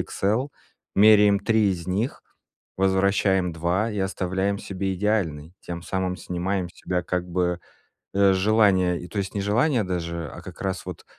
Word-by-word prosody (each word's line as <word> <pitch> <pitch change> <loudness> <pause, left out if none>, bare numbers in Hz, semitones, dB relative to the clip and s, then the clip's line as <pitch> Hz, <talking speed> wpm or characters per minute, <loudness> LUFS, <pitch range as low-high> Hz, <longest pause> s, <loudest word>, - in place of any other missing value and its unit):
"XL", 110 +8 -1 0.5
меряем 105 0 +6
3 105 0 +2
из 85 -2 -4
них, 100 +8 -2 0.5
возвращаем 95 -1 +2
2 90 +7 0
и 105 - -4
оставляем 95 +1 -1
себе 95 0 -3
идеальный, 90 -6 -1
тем 85 -1 -7
самым 95 0 -2
снимаем 90 +1 -2
с - - -18
тебя 90 0 -3
как 90 +1 -3
бы, 90 0 0 0.5
э, 100 0 +5
желание, 95 -3 +2
то 100 - -5
есть 95 -1 -3
не 100 - -1
желание 115 +6 +2
даже, 85 -3 -3
а - - -10
как - - -11
раз 95 -3 -3
вот - - -7
95 Hz, 155 wpm, -24 LUFS, 90-100 Hz, 0.5 s, меряем